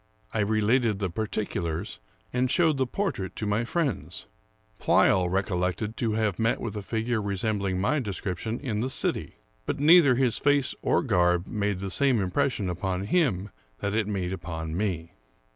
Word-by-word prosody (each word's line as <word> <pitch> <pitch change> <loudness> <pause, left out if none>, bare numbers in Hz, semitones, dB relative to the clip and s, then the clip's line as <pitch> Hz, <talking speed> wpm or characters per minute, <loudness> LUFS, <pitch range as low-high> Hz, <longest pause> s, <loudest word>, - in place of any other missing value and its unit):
I 110 - -1
related 110 +2 +2
the 95 -3 -2
particulars, 100 -4 -3 0.3
and 125 +1 +1
showed 160 0 +3
the 130 -1 +1
portrait 125 - -3
to 110 - -4
my 105 +3 0
friends. 150 0 -2 0.5
Pleyel 90 -2 +3
recollected 95 +3 -1
to 115 -3 0
have 110 -3 0
met 115 +1 +1
with 115 -3 -5
a 105 - -3
figure 110 +2 -1
resembling 100 -1 -1
my 145 +11 +1
description 105 0 -3
in 110 -6 -2
the 130 - -1
city; - - 0 0.3
but - - -2
neither 150 -3 +7
his 125 -4 +1
face 145 -2 +2
or - - +2
garb 90 -6 +2
made 100 -3 -2
the 100 -1 -4
same 135 -1 +2
impression 100 +3 0
upon 90 +1 -2
him 105 - +1 0.3
that 100 0 -2
it 110 -2 +1
made 95 -3 -2
upon 80 -3 -5
me. 90 -4 -2
105 Hz, 160 wpm, -27 LUFS, 95-120 Hz, 0.5 s, neither